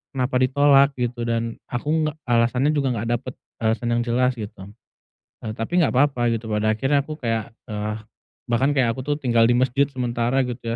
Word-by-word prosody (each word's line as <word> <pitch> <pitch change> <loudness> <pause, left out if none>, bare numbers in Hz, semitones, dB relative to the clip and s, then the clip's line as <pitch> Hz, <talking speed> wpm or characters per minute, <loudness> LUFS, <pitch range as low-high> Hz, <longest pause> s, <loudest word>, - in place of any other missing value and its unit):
kenapa 130 0 -1
ditolak, 140 +1 +5
gitu. 120 -1 -3
Dan, 115 0 -2
aku 155 +5 -1
nggak 155 - -4
alasannya 120 +4 +2
juga 135 -5 0
nggak 115 +2 -3
dapet 130 -1 -8 0.3
alasan 110 +2 0
yang 120 - +1
jelas, 125 +2 +1
gitu. 105 -4 -8 0.8
Eee, 110 - -3
tapi 140 +10 -2
nggak - - +2
papa, 125 -3 +2
gitu. 115 0 -3
Pada 110 0 +1
akhirnya, 135 +5 +1
aku 155 +1 -8
kayak, 115 -2 -2 0.2
eee, 105 0 -3 0.5
bahkan 135 +5 +2
kayak, 125 -4 +3
aku 130 - -6
tuh, 145 0 0
tinggal 120 -5 +3
di - - +4
mesjid 130 +2 +2
sementara, 125 0 0
gitu 125 0 -6
125 Hz, 185 wpm, -23 LUFS, 115-135 Hz, 0.8 s, ditolak